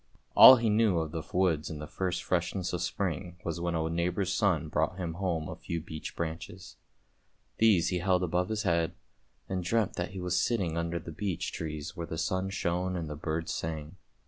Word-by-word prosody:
All 130 Hz, -, +12 dB
he 115 Hz, -2 st, 0 dB
knew 105 Hz, -3 st, +3 dB
of 80 Hz, -2 st, -1 dB
the 80 Hz, -, -3 dB
woods 90 Hz, -5 st, +1 dB
in 80 Hz, -, -5 dB
the 75 Hz, -, -6 dB
first 90 Hz, +3 st, -2 dB
freshness 90 Hz, +1 st, -1 dB
of 90 Hz, -, -1 dB
spring 90 Hz, -1 st, -3 dB
was 85 Hz, 0 st, -3 dB
when 85 Hz, -1 st, -1 dB
a 80 Hz, 0 st, 0 dB
neighbour's 90 Hz, +3 st, 0 dB
son 90 Hz, -5 st, +1 dB
brought 80 Hz, +4 st, 0 dB
him 85 Hz, -3 st, -3 dB
home 85 Hz, -3 st, -2 dB
a -, -, -6 dB
few 85 Hz, -, -4 dB
beech 80 Hz, -1 st, -7 dB
branches. 85 Hz, +2 st, -6 dB, 0.8 s
These 105 Hz, -7 st, +5 dB
he 90 Hz, -, 0 dB
held 90 Hz, 0 st, +2 dB
above 90 Hz, +2 st, 0 dB
his 110 Hz, -1 st, -1 dB
head, 85 Hz, -1 st, +1 dB, 0.5 s
and 95 Hz, -1 st, -2 dB
dreamt 105 Hz, +3 st, 0 dB
that 90 Hz, -, -2 dB
he 95 Hz, -, -7 dB
was 90 Hz, -1 st, +1 dB
sitting 95 Hz, -9 st, 0 dB
under 85 Hz, 0 st, -1 dB
the 85 Hz, -, -7 dB
beech 95 Hz, 0 st, -3 dB
trees 75 Hz, +1 st, -5 dB
where 85 Hz, -2 st, -5 dB
the 80 Hz, -, -5 dB
sun 95 Hz, +3 st, -1 dB
shone 90 Hz, 0 st, -1 dB
and 80 Hz, -3 st, -4 dB
the -, -, -4 dB
birds 80 Hz, +2 st, -3 dB
sang. 80 Hz, +2 st, -5 dB
85 Hz, 200 wpm, -30 LUFS, 80-95 Hz, 0.8 s, All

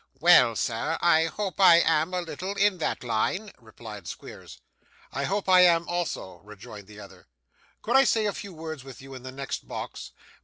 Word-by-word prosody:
'Well, 125 Hz, -9 st, +6 dB
sir, 115 Hz, +10 st, -2 dB
I 165 Hz, -2 st, +4 dB
hope 195 Hz, +3 st, -4 dB
I 180 Hz, -3 st, +8 dB
am 160 Hz, +1 st, +1 dB
a 180 Hz, 0 st, -2 dB
little 185 Hz, +4 st, -6 dB
in 200 Hz, -2 st, +2 dB
that 155 Hz, -, -2 dB
line,' 180 Hz, -, -1 dB
replied 110 Hz, -4 st, -11 dB
Squeers. -, -, -10 dB, 0.6 s
'I 140 Hz, +2 st, -2 dB
hope 200 Hz, +4 st, -2 dB
I 185 Hz, -1 st, +6 dB
am 170 Hz, -1 st, +4 dB
also,' 170 Hz, -, -4 dB
rejoined 105 Hz, -1 st, -12 dB
the 105 Hz, 0 st, -13 dB
other. 100 Hz, -, -14 dB, 0.6 s
'Could 240 Hz, -, 0 dB
I 270 Hz, -, +7 dB
say 225 Hz, -4 st, +1 dB
a 205 Hz, -, -1 dB
few 200 Hz, -, -8 dB
words 160 Hz, -4 st, -8 dB
with 135 Hz, -1 st, -12 dB
you 135 Hz, 0 st, -12 dB
in 130 Hz, -, -9 dB
the 130 Hz, +1 st, -8 dB
next 135 Hz, +1 st, -6 dB
box? -, -, -7 dB
160 Hz, 190 wpm, -26 LUFS, 120-185 Hz, 0.6 s, I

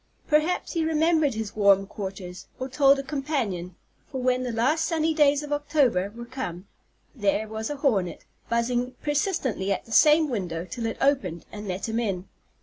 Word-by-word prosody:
Perhaps 310 Hz, +4 st, +1 dB
he 330 Hz, -2 st, 0 dB
remembered 315 Hz, -3 st, +2 dB
his 220 Hz, -2 st, -4 dB
warm 200 Hz, -2 st, +5 dB
quarters, 190 Hz, -2 st, -7 dB
or 260 Hz, -, -3 dB
told 275 Hz, +1 st, +4 dB
a 275 Hz, -, -3 dB
companion; 265 Hz, -, -3 dB, 0.4 s
for 265 Hz, -, -3 dB
when 255 Hz, 0 st, +1 dB
the 250 Hz, -1 st, -2 dB
last 265 Hz, +8 st, +1 dB
sunny 320 Hz, -1 st, +1 dB
days 295 Hz, -1 st, +3 dB
of 295 Hz, 0 st, -3 dB
October 275 Hz, -10 st, +1 dB
were 235 Hz, 0 st, -7 dB
come, 210 Hz, -8 st, -6 dB, 0.5 s
there 210 Hz, -2 st, 0 dB
was 220 Hz, +1 st, -4 dB
a 295 Hz, -, -3 dB
hornet, 205 Hz, -, 0 dB, 0.2 s
buzzing 245 Hz, +2 st, 0 dB
persistently 290 Hz, -, 0 dB
at 195 Hz, -, -1 dB
the 225 Hz, -, -15 dB
same 305 Hz, +6 st, +6 dB
window 180 Hz, -, -3 dB
till 230 Hz, +3 st, -4 dB
it 225 Hz, -, -4 dB
opened 270 Hz, -, +1 dB
and 210 Hz, 0 st, -7 dB
let 185 Hz, +3 st, -3 dB
him 225 Hz, +1 st, -1 dB
in. 195 Hz, -5 st, -2 dB
245 Hz, 175 wpm, -26 LUFS, 200-290 Hz, 0.5 s, same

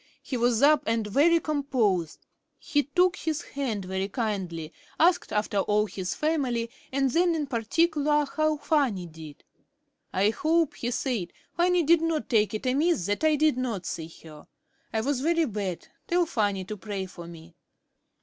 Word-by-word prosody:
He 265 Hz, -, -4 dB
was 240 Hz, 0 st, +2 dB
up 300 Hz, 0 st, +6 dB
and 225 Hz, -1 st, +1 dB
very 295 Hz, +11 st, +4 dB
composed. 250 Hz, -, -1 dB, 0.3 s
He 290 Hz, -, 0 dB
took 355 Hz, +6 st, +2 dB
his 315 Hz, -2 st, -3 dB
hand 235 Hz, -9 st, -3 dB
very 190 Hz, +1 st, -2 dB
kindly, 185 Hz, -8 st, -3 dB, 0.3 s
asked 345 Hz, +2 st, +3 dB
after 210 Hz, -1 st, 0 dB
all 210 Hz, +2 st, +2 dB
his 190 Hz, -3 st, -4 dB
family, 255 Hz, -7 st, -1 dB, 0.2 s
and 270 Hz, -1 st, +1 dB
then 340 Hz, +3 st, +3 dB
in 305 Hz, -2 st, -1 dB
particular 295 Hz, +4 st, +1 dB
how 310 Hz, 0 st, +2 dB
Fanny 275 Hz, -, 0 dB
did. 160 Hz, -3 st, -12 dB, 0.7 s
"I 200 Hz, +3 st, +2 dB
hope," 320 Hz, +5 st, +1 dB
he 240 Hz, -, -2 dB
said, 240 Hz, -7 st, -2 dB, 0.2 s
"Fanny 355 Hz, 0 st, +3 dB
did 330 Hz, +2 st, +4 dB
not 330 Hz, -2 st, -1 dB
take 215 Hz, -3 st, +2 dB
it 215 Hz, -, -5 dB
amiss 280 Hz, -, +2 dB
that 205 Hz, +8 st, -1 dB
I 310 Hz, -1 st, +4 dB
did 300 Hz, -3 st, +2 dB
not 230 Hz, -8 st, -3 dB
see 160 Hz, -1 st, -4 dB, 0.2 s
her. 155 Hz, -2 st, -13 dB, 0.4 s
I 220 Hz, -, 0 dB
was 265 Hz, +2 st, -1 dB
very 330 Hz, +2 st, +2 dB
bad. 200 Hz, -, -4 dB, 0.2 s
Tell 350 Hz, 0 st, +2 dB
Fanny 205 Hz, -, -1 dB
to 210 Hz, +3 st, -6 dB
pray 200 Hz, -2 st, -4 dB
for 175 Hz, -2 st, -10 dB
me." 165 Hz, 0 st, -12 dB
245 Hz, 165 wpm, -27 LUFS, 200-310 Hz, 0.7 s, up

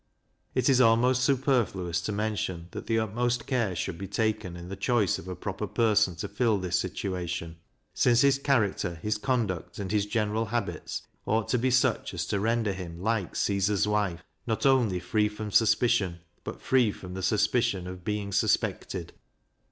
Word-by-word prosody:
It 130 Hz, -1 st, +2 dB
is 130 Hz, -2 st, +5 dB
almost 125 Hz, +2 st, +4 dB
superfluous 120 Hz, -, +1 dB
to 105 Hz, -, -3 dB
mention, 100 Hz, -5 st, -2 dB
that -, -, -7 dB
the 115 Hz, -, +1 dB
utmost 120 Hz, +2 st, 0 dB
care 115 Hz, -8 st, 0 dB
should 85 Hz, +1 st, -3 dB
be 95 Hz, -, -5 dB
taken 110 Hz, -6 st, -1 dB
in 85 Hz, 0 st, -9 dB
the 95 Hz, -, -5 dB
choice 105 Hz, -1 st, +1 dB
of 90 Hz, -, -11 dB
a 90 Hz, -, -4 dB
proper 100 Hz, +4 st, -4 dB
person 105 Hz, -4 st, +2 dB
to 85 Hz, +5 st, -4 dB
fill 110 Hz, +1 st, +1 dB
this 90 Hz, -2 st, 0 dB
situation, 90 Hz, -3 st, -4 dB, 0.4 s
since 120 Hz, -1 st, +4 dB
his 140 Hz, -1 st, +4 dB
character, 105 Hz, -10 st, +1 dB
his 105 Hz, +6 st, -2 dB
conduct, 110 Hz, -9 st, -1 dB
and 95 Hz, -2 st, -4 dB
his 105 Hz, -1 st, +1 dB
general 110 Hz, 0 st, 0 dB
habits, 115 Hz, -1 st, -3 dB, 0.2 s
ought 110 Hz, +1 st, +1 dB
to 125 Hz, -, +2 dB
be 130 Hz, +2 st, +1 dB
such 125 Hz, -6 st, +1 dB
as 85 Hz, -1 st, -2 dB
to 100 Hz, +3 st, -1 dB
render 110 Hz, -1 st, +1 dB
him 85 Hz, -3 st, -7 dB
like 105 Hz, -1 st, -1 dB
Caesar's 100 Hz, +1 st, +1 dB
wife 100 Hz, -5 st, 0 dB, 0.2 s
"not 115 Hz, +4 st, -1 dB
only 120 Hz, -9 st, +3 dB
free 105 Hz, +5 st, +1 dB
from 105 Hz, 0 st, -6 dB
suspicion, 110 Hz, -5 st, +3 dB, 0.2 s
but -, -, -7 dB
free 125 Hz, -5 st, +3 dB
from 90 Hz, -2 st, -9 dB
the 95 Hz, -, -5 dB
suspicion 105 Hz, 0 st, +1 dB
of 90 Hz, 0 st, -8 dB
being 105 Hz, 0 st, -2 dB
suspected." -, -, 0 dB
105 Hz, 175 wpm, -28 LUFS, 95-115 Hz, 0.4 s, is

